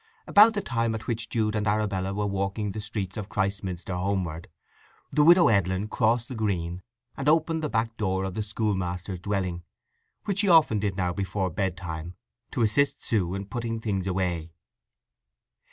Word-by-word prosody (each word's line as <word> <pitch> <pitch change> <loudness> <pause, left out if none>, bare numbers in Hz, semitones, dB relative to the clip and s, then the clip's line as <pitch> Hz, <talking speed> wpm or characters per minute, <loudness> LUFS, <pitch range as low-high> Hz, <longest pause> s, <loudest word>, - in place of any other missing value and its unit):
About 215 +2 +7
the 205 - 0
time 115 -7 -1
at 110 - -6
which 115 -1 -3
Jude 110 -2 0
and 105 -1 -1
Arabella 100 -2 0
were 105 +1 -1
walking 100 +1 -2
the 105 - -5
streets 105 -2 -4
of 105 -1 -5
Christminster 95 -2 -2
homeward, 90 -3 -2 0.6
the 150 - +4
Widow 170 0 +7
Edlin 100 -1 +1
crossed 115 +1 +1
the - - -6
green, 90 -6 -2 0.3
and 140 +2 0
opened 160 +1 +2
the 150 - 0
back 115 0 -1
door 95 -2 0
of 95 -1 -3
the 110 - -2
schoolmaster's 95 -4 -2
dwelling, 90 -3 -2 0.6
which 200 -1 -1
she 205 -2 +3
often 155 -11 +5
did 100 -2 -1
now 90 -2 0
before 95 -1 -2
bedtime, 90 -2 -3 0.3
to 120 - 0
assist 140 +6 +2
Sue 95 -5 0
in 100 0 -4
putting 115 +1 -3
things 100 -4 -2
away. 90 -3 -1
100 Hz, 170 wpm, -27 LUFS, 95-115 Hz, 0.6 s, About